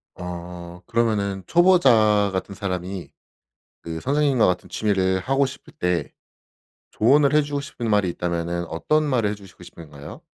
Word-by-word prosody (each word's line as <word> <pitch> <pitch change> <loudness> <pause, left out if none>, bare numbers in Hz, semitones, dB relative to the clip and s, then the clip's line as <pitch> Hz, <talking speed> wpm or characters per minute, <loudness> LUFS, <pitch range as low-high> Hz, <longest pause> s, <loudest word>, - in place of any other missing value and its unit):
아 90 0 -8
그러면은 105 -5 0
초보자 120 - +4
같은 95 +1 -4
사람이 90 -4 -5 0.7
그 80 -1 -6
선생님과 140 - +2
같은 90 0 -2
취미를 95 -1 0
하고 135 +7 +1
싶을 130 - -9
때 90 -4 -1 0.8
조언을 140 +5 +3
해 150 - +5
주고 145 -1 -3
싶은 120 -4 -5
말이 105 -3 +2
있다면은 85 0 -3
어떤 155 - 0
말을 125 -8 +1
해 - - -4
주시고 95 -3 -15
싶은가요? 75 -4 -11
100 Hz, 315 characters per minute, -23 LUFS, 90-130 Hz, 0.8 s, 해